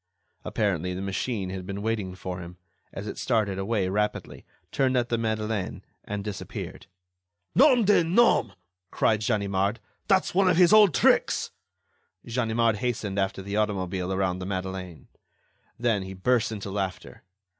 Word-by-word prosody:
Apparently, 90 -4 -1
the 95 - -4
machine 100 0 -2
had 95 -1 -5
been 100 0 -5
waiting 105 -5 -2
for 90 0 -6
him, 90 0 -9 0.3
as 100 - -7
it - - -6
started 105 -6 0
away 100 -1 0
rapidly, 105 +2 -2 0.2
turned 130 -1 +1
at 120 -1 0
the 115 - +1
Madeleine 110 -3 -2 0.2
and 100 -1 -4
disappeared. 105 -2 -7 0.7
"Nom 255 -4 +5
de 205 -3 +5
nom!" 180 - +3 0.4
cried 110 -1 +1
Ganimard, 100 -1 0 0.3
"that's 190 -2 +2
one 190 0 +4
of 175 - +3
his 180 +2 +6
old 210 -8 +7
tricks!" 115 - +3 0.7
Ganimard 115 -2 +1
hastened 110 -4 -2
after 95 0 -1
the 100 +2 -3
automobile 95 -3 -1
around 95 -1 0
the 90 - -5
Madeleine. 95 -2 -5 0.7
Then, 115 -4 +1
he 95 0 -7
burst 115 +4 +1
into 100 -2 -5
laughter. 95 -2 -4
105 Hz, 145 wpm, -26 LUFS, 95-120 Hz, 0.7 s, old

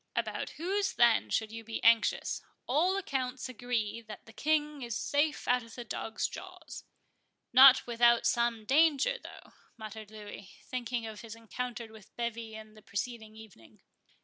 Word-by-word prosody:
"About - - -2
whose, 390 +4 0
then, 235 -1 +4
should 220 -1 0
you 225 0 -7
be 225 0 -6
anxious?—All 280 - +2
accounts 260 -8 -3
agree 235 -2 -2
that 220 -2 -11
the 225 - -15
King 300 +1 0
is 235 -3 -4
safe 295 +1 0
out 250 0 +3
of 230 -1 -13
the 240 - -6
dogs' 225 -1 -3
jaws." - - -10 0.7
"Not 260 +1 +9
without 235 0 +4
some 235 -2 +1
danger, 315 - +3
though," - - -12 0.2
muttered 215 -1 -8
Louis, 210 -2 -10
thinking 245 -2 -3
of 220 -1 -7
his 225 -1 -9
encounter 235 +1 -5
with 215 -2 -16
Bevis 230 -2 -4
on 215 0 -12
the 215 - -16
preceding 220 +2 -5
evening. 215 - -16
235 Hz, 150 wpm, -31 LUFS, 220-260 Hz, 0.7 s, Not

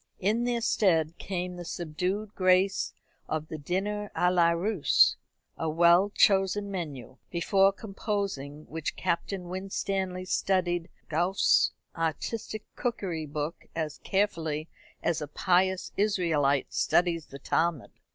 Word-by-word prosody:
In 220 +5 +1
their 240 -1 0
stead 170 -8 +2
came 180 -1 -3
the 175 - -6
subdued 180 +6 -3
grace 185 +1 +3 0.4
of 155 0 -2
the 155 - -5
dîner 200 +6 -2
à 180 0 +2
la 170 -2 +5
Russe, 175 +1 +3 0.4
a 160 - 0
well 170 +4 +5
chosen 200 0 +3
menu, 145 -8 -6
before 195 +3 +3
composing 195 -8 -4
which 160 -1 -4
Captain 180 +2 -2
Winstanley 190 0 -3
studied 175 -2 0 0.2
Gouffé's 175 +5 +3 0.3
artistic 205 +7 -3
cookery 180 -10 -2
book 150 +3 -4
as 155 -2 -3
carefully 165 -6 -1 0.4
as 165 -2 0
a 150 - -3
pious 185 +4 +1
Israelite 165 -9 +1
studies 170 -2 +2
the 140 - -9
Talmud. 160 0 0
180 Hz, 120 wpm, -28 LUFS, 160-195 Hz, 0.4 s, la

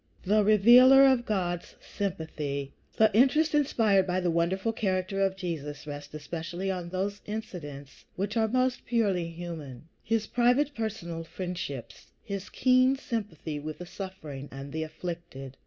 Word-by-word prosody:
XV 185 - -8
THE 210 0 +5
REVEALER 245 +6 +8
OF 260 -3 +4
GOD'S 175 -4 -2
SYMPATHY 155 -8 -4 0.2
The 220 -2 +4
interest 300 +6 +4
inspired 220 -10 +3
by 180 +1 +1
the 175 -2 0
wonderful 185 +7 0
character 190 -2 -1
of 195 -1 +2
Jesus 155 -6 -5
rests 145 -1 -7
especially 170 +5 -4
on 180 -2 -4
those 195 +3 -3
incidents 150 -10 -7
which 200 +4 -2
are 220 -1 +3
most 255 +2 0
purely 200 -8 +1
human, 165 -5 -8
his 225 -1 0
private, 250 +4 +2
personal 185 -8 -4
friendships, 165 -10 -6 0.2
his 200 -1 -5
keen 255 +1 +4
sympathy 200 - -4
with 155 +1 -6
the 180 - -8
suffering 160 -8 -8
and 135 +1 -8
the 160 - -2
afflicted. 160 -5 -6
185 Hz, 145 wpm, -28 LUFS, 160-220 Hz, 0.2 s, REVEALER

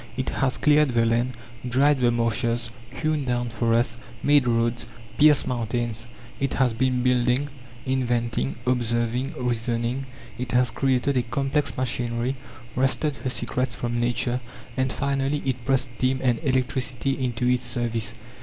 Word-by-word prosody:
It 130 - -1
has 135 -1 0
cleared 150 -4 +4
the 115 0 +4
land, 120 +1 +1 0.3
dried 135 +3 +3
the 125 -1 +4
marshes, 115 0 0 0.2
hewn 150 +3 -1
down 120 -1 -1
forests, 115 0 +1 0.3
made 145 -3 +4
roads, 115 0 +1 0.3
pierced 150 -1 +6
mountains; 120 -1 -2 0.3
it 135 - -1
has 130 -3 +2
been 125 +1 +1
building, 125 +2 +2 0.4
inventing, 120 - 0
observing, 120 +1 0
reasoning; 120 +2 -1 0.3
it 125 -2 -3
has 125 -1 +3
created 130 +2 +1
a - - +4
complex 135 +4 -1
machinery, 120 0 -1 0.4
wrested 135 +3 +1
her 130 - -3
secrets 125 -1 -1
from 120 0 -2
Nature, 120 +1 0 0.3
and 130 0 +1
finally 140 +1 -1
it 130 -2 -2
pressed 135 -1 +2
steam 130 +1 +1
and 120 -3 +2
electricity 130 -1 0
into 125 -1 -1
its 125 0 +2
service. 120 -1 -2
125 Hz, 140 wpm, -25 LUFS, 120-135 Hz, 0.4 s, pierced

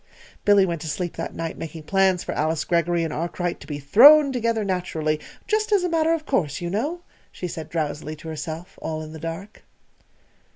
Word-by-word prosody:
Billy 205 -2 +6
went 170 -4 -3
to - - -5
sleep 175 +3 -3
that - - -5
night 165 -1 -4
making 160 0 -7
plans 190 +1 +2
for - - -4
Alice 155 +1 0
Greggory 170 0 +1
and 160 -2 -3
Arkwright 175 +2 -3
to - - -13
be 145 - -4
thrown 275 - +7
together 230 -3 0
naturally 160 -5 -1 0.3
"just 430 0 0
as 400 -3 +4
a 360 - 0
matter 325 -1 +2
of 320 -2 -2
course, 150 - 0
you 175 0 -4
know," 295 - -2 0.3
she 180 - -5
said 160 -2 -7
drowsily 155 -1 -3
to 155 +2 -12
herself, 160 +2 -6
all 155 0 -3
in 155 0 -9
the 160 - -8
dark. 165 +6 -7
175 Hz, 200 wpm, -24 LUFS, 160-220 Hz, 0.3 s, thrown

